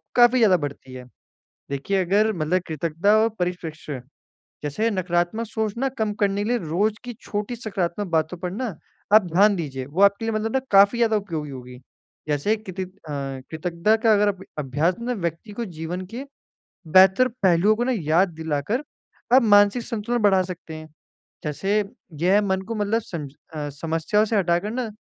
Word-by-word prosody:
काफ़ी 240 +1 +6
ज़्यादा 205 -6 +5
बढ़ती 140 -4 -6
है। 130 0 -8 0.7
देखिए 140 +8 -1
अगर 210 +5 +2
मतलब 175 0 0
कृतज्ञता 165 +6 +1
और 220 +1 +4
परिपेक्ष 175 -4 -4 0.8
जैसे 150 +11 0
नकारात्मक 180 +3 -1
सोचना 220 +4 -2
कम 215 -1 0
करने 200 0 +1
के 215 - -2
लिए 245 - +2
रोज़ 205 +7 +1
की 245 - -5
छोटी 210 +3 -4
सकारात्मक 200 -3 -3
बातों 160 +2 0
पर 180 0 -4
ना, 220 -1 -4 0.4
आप 215 -2 +8
ध्यान 205 +3 +5
दीजिए 135 -6 -4
वो 155 +8 -2
आपके 200 +2 +4
लिए 225 - -1
मतलब 220 +1 -2
ना 265 - +3
काफ़ी 200 +4 +6
ज़्यादा 225 -2 +3
उपयोगी 165 -8 -5
होगी। 125 -1 -9 0.5
जैसे 150 +9 +1
कित 190 -3 -10
अ, 185 - -2 0.2
कृतज्ञता 155 +8 -1
का 225 0 +3
अगर 210 0 +3
अब 195 -1 -5 0.2
अभ्यास 150 +6 0
में 245 +1 -1
व्यक्ति 170 +2 -4
को 235 - -2
जीवन 170 +3 -4
के 255 +4 -4 0.6
बेहतर 190 +8 +6 0.2
पहलुओं 190 +3 +4
को 240 - -1
ना 260 - +1
याद 165 +5 +2
दिलाकर 160 - -2 0.5
आप 265 - +8
मानसिक 205 +2 +5
संतुलन 235 +1 -2
बढ़ा 195 -2 +5
सकते 175 -3 -8
हैं। 155 0 -9 0.6
जैसे 195 +7 -1 0.5
यह 195 +3 +4
मन 190 -2 0
को 230 - -2
मतलब 210 +2 0
सम 165 -8 -6 0.3
अ, 150 -1 -3
समस्याओं 165 +8 0
से 220 0 0
हटाकर 180 +2 +1
ना 245 -2 -3
190 Hz, 175 wpm, -23 LUFS, 160-215 Hz, 0.8 s, आप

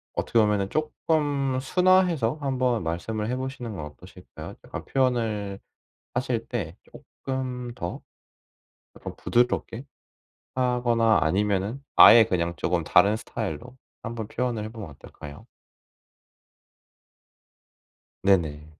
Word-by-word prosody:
어떻게 115 - -1
보면은 105 -3 +3
쪼끔 145 -3 0
순화해서 175 -5 +2
한번 130 -5 0
말씀을 105 +7 -3
해 125 - -1
보시는 130 -4 -5
건 75 -6 -6
어떠실까요? 75 - -11
약간 - - -7
표현을 110 -7 -1 0.5
하실 125 -2 -1
때 95 -9 -4 0.2
쪼끔 125 -2 -6
더 85 - -5 0.9
아 - - -16
좀 - - -6
부드럽게 120 +1 0 0.7
하거나 120 -3 +2
아니면은 100 - 0
아예 115 0 +10
그냥 85 -4 -1
쪼금 85 +1 -1
다른 100 +3 +4
스타일로 115 +2 -6 0.3
한번 115 -2 -5
표현을 120 -2 -2
해 110 - -5
보면 110 -6 -8
어떨까요? 70 +1 -12 2.8
네네. 80 -6 +1
115 Hz, 245 characters per minute, -25 LUFS, 100-130 Hz, 2.8 s, 아예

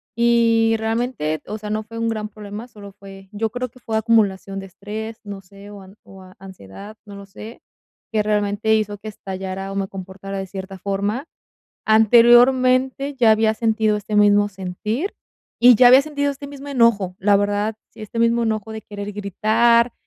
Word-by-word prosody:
Y 230 -1 +3
realmente 220 -8 -2
o 215 - -5
sea, 210 0 -8
no 215 +1 -2
fue 230 +1 -11
un 230 0 -1
gran 215 -1 -3
problema, 210 +2 -9
solo 205 -4 -13
fue 195 -1 -13
yo 220 +1 -2
creo 250 +1 -4
que 255 - -20
fue 220 -2 -3
acumulación 200 -3 +1
de 195 - -8
estrés, 215 +4 -8
no 200 -2 -8
sé, 200 +2 -15
o 200 -1 -11
an 190 +2 -16
o 195 -1 -15
a 185 0 -16
ansiedad, 195 - -12
no 200 -1 -11
lo 200 0 -10
sé, 215 +3 -12 0.5
que 215 - +2
realmente 210 +1 0
hizo 210 -1 -2
que 215 - -11
estallara, 195 -1 -6
o - - -6
me 195 -1 -2
comportara 195 +1 -8
de 190 0 -5
cierta 190 0 -8
forma. 200 - -3 0.6
Anteriormente, 255 +5 +4
ya 235 -4 +4
había 220 0 +2
sentido 220 -1 +1
este 210 +1 -5
mismo 205 0 +4
sentir, 205 - -4 0.4
y 245 0 +7
ya 245 +2 +7
había 260 +3 +8
sentido 285 -1 -2
este 280 +1 -9
mismo 285 0 -10
enojo. 225 -8 +2
La 200 +1 +3
verdad, 205 +2 -1 0.2
este 220 +2 -7
mismo 230 0 +2
enojo 220 -1 -2
de 220 0 -7
querer 205 0 -7
gritar, 225 +4 +2
215 Hz, 180 wpm, -20 LUFS, 200-230 Hz, 0.6 s, había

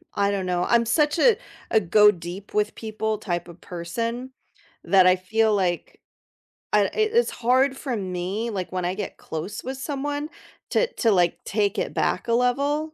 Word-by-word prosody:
I 200 0 +2
don't 195 -2 -1
know, 180 -1 0
I'm 235 -1 +3
such 295 +6 +2
a 445 +4 +5 0.3
a 220 - +5
go 210 +3 +6
deep 175 +3 -9
with 210 0 0
people 220 -1 -3
type 175 -4 -3
of 170 +1 -13
person 230 +9 -4 0.5
that 190 -2 +5
I 185 - +6
feel 215 +3 +1
like 180 -3 -2 0.7
I 205 -1 +5
e - - -6
it's 440 +2 +2
hard 260 +3 +2
for 260 -5 -3
me, 190 +4 -3
like, 190 -4 -4
when 180 -1 -2
I 180 +2 -1
get 205 -2 -5
close 170 +7 -6
with 260 +1 -5
someone 290 +2 -3 0.4
to - - +3
to, 225 - +2
like, 175 -3 +3
take 205 0 0
it - - -2
back 190 - 0
a - - +3
level, 285 +6 +1
215 Hz, 180 wpm, -24 LUFS, 185-255 Hz, 0.7 s, go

